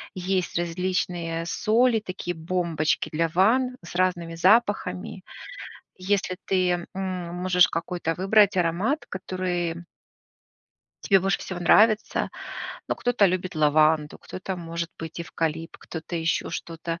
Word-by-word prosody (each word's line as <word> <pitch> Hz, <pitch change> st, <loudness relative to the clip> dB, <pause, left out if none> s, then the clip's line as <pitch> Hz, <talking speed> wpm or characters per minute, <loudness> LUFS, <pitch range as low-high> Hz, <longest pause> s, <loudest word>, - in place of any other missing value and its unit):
есть 185 Hz, -1 st, -1 dB
различные 175 Hz, -1 st, -2 dB
соли, 230 Hz, +5 st, +2 dB
такие 185 Hz, -3 st, -5 dB
бомбочки 165 Hz, -2 st, -1 dB
для 165 Hz, +1 st, +1 dB
ванн 235 Hz, +9 st, +3 dB
с 175 Hz, -, -10 dB
разными 175 Hz, -2 st, 0 dB
запахами. 190 Hz, -1 st, +2 dB, 0.7 s
Если 185 Hz, -1 st, -1 dB
ты, 180 Hz, -2 st, +1 dB
м, 185 Hz, -2 st, -4 dB
можешь 180 Hz, 0 st, +4 dB
какой-то 165 Hz, 0 st, -2 dB
выбрать 200 Hz, +1 st, +4 dB
аромат, 185 Hz, -, 0 dB
который 180 Hz, -2 st, -3 dB, 1.2 s
Тебе 195 Hz, -3 st, +5 dB
больше 195 Hz, 0 st, +1 dB
всего 180 Hz, -2 st, -6 dB
нравится. 215 Hz, +5 st, +4 dB, 0.6 s
Ну, -, -, -1 dB
кто-то 245 Hz, -5 st, +2 dB
любит 185 Hz, -2 st, -2 dB
лаванду, 155 Hz, 0 st, +3 dB
кто-то, 185 Hz, +1 st, -6 dB
может 170 Hz, 0 st, -4 dB
быть, 165 Hz, +1 st, -6 dB
эвкалипт, 165 Hz, -1 st, -3 dB
кто-то 160 Hz, +1 st, -8 dB
ещё 165 Hz, -1 st, 0 dB
что-то. 165 Hz, 0 st, -5 dB
180 Hz, 115 wpm, -25 LUFS, 165-190 Hz, 1.2 s, Тебе